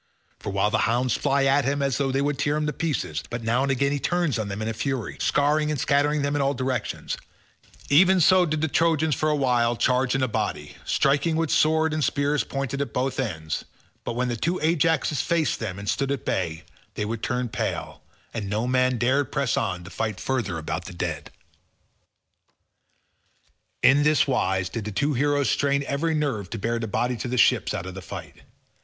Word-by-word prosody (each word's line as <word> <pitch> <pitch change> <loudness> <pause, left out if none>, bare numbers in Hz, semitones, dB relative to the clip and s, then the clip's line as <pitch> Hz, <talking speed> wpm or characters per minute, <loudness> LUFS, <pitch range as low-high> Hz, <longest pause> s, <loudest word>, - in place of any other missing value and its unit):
For - - -5
a - - -3
while 100 +2 +1
the - - +2
hounds 125 +1 +1
fly 140 -1 +1
at 135 +1 +3
him 140 +2 0
as 135 -1 0
though 135 -1 +1
they 135 +1 +1
would 145 -1 -1
tear 145 +1 +1
him 150 0 -1
in 150 - -1
pieces, 130 - -2
but 120 -1 -5
now 115 +3 +1
and 135 0 +1
again 140 +1 +1
he 145 - -1
turns 175 -6 0
on 110 - -2
them 100 0 -5
in - - -3
a 115 - -1
fury, 125 0 -3
scaring 150 +1 +2
and 150 -3 -1
scattering 145 +2 +2
them 140 +1 0
in 145 - +1
all 140 +1 +1
directions—even 140 +6 -1
so 180 +2 +5
did 155 -1 -1
the 160 - +2
Trojans 160 0 +2
for 155 +4 0
a 150 - +2
while 120 -4 +2
charge 125 +2 +1
in 135 - +1
a - - +2
body, 75 -9 -3
striking 145 +4 +2
with 160 -2 0
sword 160 0 +3
and 155 - -1
with 150 - +2
spears 145 +2 +1
pointed 135 0 -3
at 140 - -4
both 130 +1 -1
the 130 -5 0
ends, 80 -1 -5 0.4
but - - -3
when 125 +2 -1
the 120 - -1
two 170 +10 -1
Ajaxes 160 -3 +2
faced 165 -3 0
them 100 -5 -4
and 100 0 -7
stood 135 +5 0
at 140 -6 -3
bay, 80 -4 -2 0.3
they 105 - -2
would 110 +1 -4
turn 125 0 -1
pale - - -4 0.3
and 105 -4 -4
no 110 +3 -1
man 130 0 +2
dared 130 +5 +1
press 140 -4 0
on 90 -5 -2
to 90 - -11
fight 110 -4 -3
further 115 -10 -2
about 80 - -4
the - - -8
dead. 80 -4 -4 2.5
In 140 +2 +6
this 150 +1 +4
wise 95 -8 0
did 110 +3 -5
the 105 - -4
two 145 +8 0
heroes 145 +1 +1
strain 140 0 +1
every 155 +4 0
nerve 135 - -1
to - - -5
bear 115 +3 -1
the 115 - -3
body 125 +4 0
to 115 - -4
the 125 +1 -2
ships - - +3
out - - -4
of 95 - -6
the 95 - -7
fight. - - -9
135 Hz, 215 wpm, -25 LUFS, 115-145 Hz, 2.5 s, In